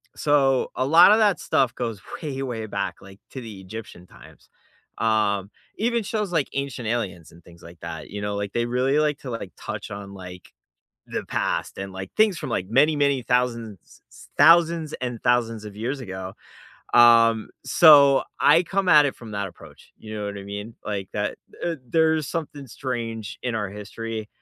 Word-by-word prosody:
so 135 -3 +2
a 130 - 0
lotta 175 +8 +7
that 205 -6 +3
stuff 130 -1 +1
goes 115 -5 -4 0.2
way, 135 -3 -4
way 115 -4 -4
back, 100 -2 -3
like, 100 0 -14
to 130 - -7
the 110 -4 -9
Egyptian 95 -2 -10
times. - - -18 0.5
Um, 105 -3 +1 0.3
even 235 +1 0
shows 210 -2 -3
like 155 -5 +1
Ancient 140 -3 -4
Aliens 100 -8 -3
and 85 - -17
things 85 -1 -17
like 85 0 -13
that, 80 -2 -7
you 105 - -6
know? 105 0 -3
Like, 100 -1 -3
they 120 0 0
really 130 +4 +1
like 150 -2 0
to, 130 - -8
like, 115 -6 -6
touch 105 -2 -7
on, 100 0 -8
like, 90 -2 -11 0.6
the - - -4
past - - -2
and, 95 0 -6
like, 95 0 -7
things 215 -4 +3
from, - - -5
like, 95 - -2
many, 150 +7 +4
many 140 -2 +2
thousands 115 -4 -1 0.3
s - - -16
thousands 165 -1 +5
and 125 -3 -4
thousands 115 -3 +1
of 105 -1 -9
years 125 +6 -3
ago, 95 -4 -7 0.6
um, 115 -2 +6 0.2
so 140 0 +7 0.2
I 170 - +6
come 195 +1 -1
at 150 -4 +7
it 135 - -3
from 115 -2 -11
that 100 -1 -2
approach, - - -16
you 110 0 -9
know 105 -1 -4
what 100 0 -5
I - - -8
mean? 105 +3 -7
Like, 100 -3 -4
that 105 0 -3 0.2
th 170 -2 -2
there's 160 +2 +2
something 150 -4 -5
strange 115 -3 -5
in 125 -2 -2
our 105 -3 -2
history, 110 +2 -6
115 Hz, 185 wpm, -24 LUFS, 100-140 Hz, 0.6 s, lotta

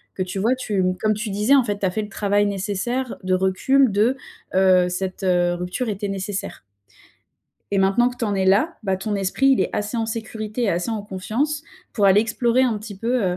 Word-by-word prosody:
que 185 - -1
tu 185 +1 -5
vois, 230 +6 +2
tu 210 -7 -1 0.2
comme 215 0 +2
tu 215 +1 -4
disais, 210 +7 +2
en 270 - +5
fait, 205 -3 -2
tu 200 - -1
as 185 - +1
fait 215 - -2
le 210 - -7
travail 205 0 +1
nécessaire 205 +6 -2
de 185 0 +1
recul, 210 +8 +2
de, 220 +6 +2 0.4
heu, 185 -1 +4
cette, 185 +2 -4
heu, 175 -1 +2
rupture 180 +7 -3
était 205 0 -3
nécessaire 195 - -4 1.1
et 200 - +1
maintenant 195 +6 +3
que 250 - -11
tu 235 - -2
en 205 - -1
es 190 -1 0
là, 210 - +2
bah, 190 -2 0
ton 205 +2 -3
esprit, 195 +7 +1
il 265 - +4
est - - 0
assez 210 +3 -2
en 225 - 0
sécurité 220 0 -4
et 220 - +2
assez 175 +6 -1
en 220 -2 -3
confiance 235 +10 -2 0.3
pour 205 - +2
aller 195 +2 +6
explorer 235 +2 +1
un 235 -4 +1
petit 210 -2 -9
peu, 235 +3 0
205 Hz, 220 wpm, -22 LUFS, 190-235 Hz, 1.1 s, aller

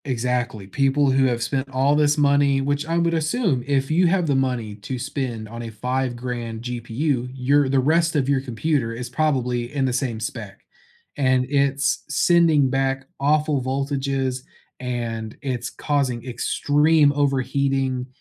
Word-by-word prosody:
Exactly, 125 -4 -2
people 135 +6 +2
who 135 0 +3
have 120 -2 0
spent 135 +2 -2
all 135 +2 +2
this 150 0 +3
money 140 -1 +3
which 145 +2 -1
I 165 +1 0
would 170 0 +1
assume, 160 - 0
if 135 0 0
you 175 +3 +4
have 180 0 +2
the 145 - +1
money 125 -5 -1
to 105 +5 -5
spend 125 -4 -4
on 115 +2 -8
a 115 - -6
five-grand 120 -1 -3
GPU, 125 +2 -2
your 135 +2 +2
the 135 0 +3
rest 165 +5 +2
of 135 -3 +1
your 140 -1 +2
computer 130 -1 -1
is 125 +1 -6
probably 125 -4 0
in 135 -2 +1
the 130 - 0
same 125 -3 -2
spec, 110 -2 -6 0.6
and 130 -2 +2
it's 140 0 +1
sending 155 -1 +4
back 135 0 0
awful 150 0 +2
voltages, 135 0 -1 0.4
and 115 -3 -4
it's 125 -3 -3
causing 135 -5 -1
extreme 145 +4 +2
overheating, 135 -2 0
135 Hz, 150 wpm, -22 LUFS, 125-145 Hz, 0.6 s, you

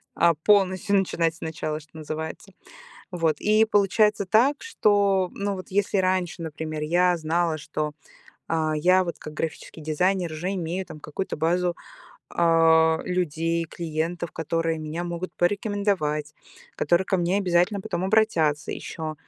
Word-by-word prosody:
а, 170 -2 +4
полностью 195 +3 +2
начинать 170 -4 +1
сначала, 155 -1 -4
что 155 +1 -16
называется. 160 +5 -6 0.6
Вот, 165 -4 0
и 215 +1 +4
получается 205 0 +2
так, 245 +9 +3
что, 200 - +2
ну, 200 0 -2
вот 185 0 -9
если 200 0 +1
раньше, 185 -2 0
например, 155 -1 -5
я 175 +3 +3
знала, 165 0 0
что, 150 0 -3 0.6
а, 155 -1 0
я 185 +4 +4
вот 170 - -5
как 155 - -9
графический 160 0 -5
дизайнер 175 +3 0
уже 175 +5 -3
имею 180 +1 -3
там 155 - -10
какую-то 155 +6 -4
базу, 175 +2 +1 0.6
а, 160 -1 +4
людей, 165 -2 -1
клиентов, 165 +1 -4
которые 165 0 -1
меня 155 +3 -4
могут 175 +1 -5
порекомендовать, 180 -6 0 0.4
которые 175 +2 +2
ко 190 - +1
мне 175 +2 +1
обязательно 185 +1 +2
потом 175 -2 -3
обратятся 170 -8 +2
ещё, 160 -2 -5
175 Hz, 135 wpm, -25 LUFS, 160-190 Hz, 0.6 s, а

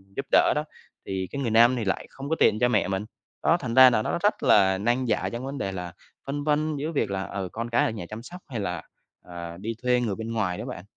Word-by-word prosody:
giúp 135 - -3
đỡ - - +5
đó, 150 - 0 0.4
thì 95 -1 -3
cái 140 - -4
người 120 -4 -1
nam 120 +3 +6
thì 115 -3 -2
lại 95 - -2
không 135 +1 -8
có 160 - +2
tiện 105 - +4
cho 125 - +4
mẹ 110 -4 +2
mình. 95 +2 -2 0.4
Đó, 165 - +4
thành 125 -6 -4
ra 130 0 +10
là 115 -3 +1
nó - - -1
rất 210 - +1
là 95 -2 +5
nan 120 +6 0
giải 110 - 0
trong 120 +2 -5
vấn 140 +1 -5
đề 100 -7 -2
là 90 -2 -6 0.3
phân 145 +1 -3
vân 155 +1 +1
giữa 150 +3 -3
việc 140 -10 -1
là, 95 -1 -2
ừ, 95 -2 -5
con 115 +1 -4
cái 120 - +3
ở - - 0
nhà 105 -6 -6
chăm 110 +1 -7
sóc 180 +7 -10
hay 125 -6 -5
là, 90 -5 -3 0.5
à, 85 -1 -7
đi 110 +5 -4
thuê 125 0 +3
người 110 -5 -1
bên 110 +2 -5
ngoài 95 -6 -1
đó - - -5
bạn. 90 - -7
115 Hz, 275 wpm, -26 LUFS, 95-130 Hz, 0.5 s, ra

